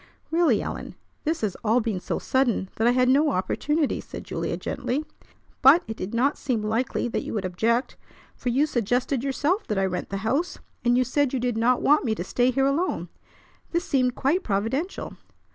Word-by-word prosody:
"Really, 335 Hz, 0 st, +3 dB
Ellen, -, -, -6 dB, 0.3 s
this 320 Hz, +2 st, 0 dB
has 210 Hz, -4 st, -1 dB
all 225 Hz, +2 st, +3 dB
been 220 Hz, -5 st, -2 dB
so -, -, -3 dB
sudden 245 Hz, -8 st, 0 dB
that 225 Hz, -, +2 dB
I -, -, +6 dB
had 250 Hz, 0 st, +3 dB
no 285 Hz, +4 st, +4 dB
opportunity," 290 Hz, -, 0 dB
said -, -, -9 dB
Julia -, -, -3 dB
gently. 270 Hz, +3 st, -3 dB, 0.6 s
"But 300 Hz, +7 st, +7 dB
it 220 Hz, -, -5 dB
did 185 Hz, -1 st, -5 dB
not 260 Hz, +5 st, +1 dB
seem 245 Hz, -6 st, -1 dB
likely 225 Hz, +4 st, -1 dB
that -, -, -1 dB
you -, -, -5 dB
would 200 Hz, -3 st, -2 dB
object, 225 Hz, +7 st, 0 dB, 0.4 s
for 250 Hz, -, -3 dB
you 270 Hz, +5 st, +3 dB
suggested 245 Hz, 0 st, 0 dB
yourself 295 Hz, +9 st, 0 dB
that 210 Hz, -, -1 dB
I 195 Hz, -, +2 dB
rent 180 Hz, -1 st, -3 dB
the 195 Hz, -, -3 dB
house, 310 Hz, +10 st, 0 dB, 0.3 s
and 240 Hz, 0 st, +3 dB
you 255 Hz, -, +4 dB
said 270 Hz, +2 st, 0 dB
you 260 Hz, -, 0 dB
did 245 Hz, -1 st, -1 dB
not 240 Hz, +3 st, +2 dB
want 295 Hz, +2 st, +4 dB
me 225 Hz, -5 st, 0 dB
to 175 Hz, -, -4 dB
stay 245 Hz, +6 st, +1 dB
here 270 Hz, +1 st, +2 dB
alone. 305 Hz, +7 st, 0 dB, 0.6 s
This 340 Hz, +2 st, 0 dB
seemed 255 Hz, -5 st, +1 dB
quite 310 Hz, +8 st, +1 dB
providential." 240 Hz, -, -2 dB
250 Hz, 195 wpm, -25 LUFS, 225-285 Hz, 0.6 s, But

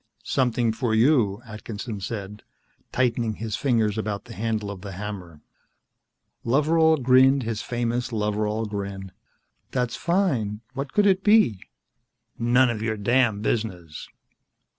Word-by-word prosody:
"Something 120 Hz, -3 st, +1 dB
for 110 Hz, -1 st, -1 dB
you," 115 Hz, -4 st, +3 dB
Atkinson 110 Hz, 0 st, -7 dB
said, 105 Hz, 0 st, -6 dB, 0.5 s
tightening 120 Hz, -3 st, 0 dB
his 110 Hz, -1 st, -4 dB
fingers 110 Hz, -5 st, +1 dB
about 105 Hz, -2 st, -3 dB
the 120 Hz, -, -10 dB
handle 110 Hz, -2 st, -2 dB
of 95 Hz, -2 st, -9 dB
the 100 Hz, -1 st, -7 dB
hammer. 90 Hz, -6 st, -7 dB, 1.0 s
Loveral 160 Hz, +5 st, +3 dB
grinned 130 Hz, +2 st, +5 dB
his 110 Hz, -1 st, -3 dB
famous 120 Hz, +1 st, -2 dB
Loveral 105 Hz, 0 st, -1 dB
grin. 100 Hz, -2 st, -5 dB, 0.6 s
"That's 125 Hz, -2 st, -1 dB
fine. 135 Hz, -, 0 dB
What 135 Hz, 0 st, -4 dB
could 210 Hz, -, +3 dB
it 195 Hz, -1 st, +3 dB
be?" 210 Hz, -, +4 dB, 0.8 s
"None 120 Hz, +2 st, +4 dB
of 110 Hz, -2 st, -4 dB
your 110 Hz, -1 st, -1 dB
damned 110 Hz, -1 st, +2 dB
business." 90 Hz, -9 st, -3 dB
115 Hz, 125 wpm, -24 LUFS, 105-125 Hz, 1.0 s, grinned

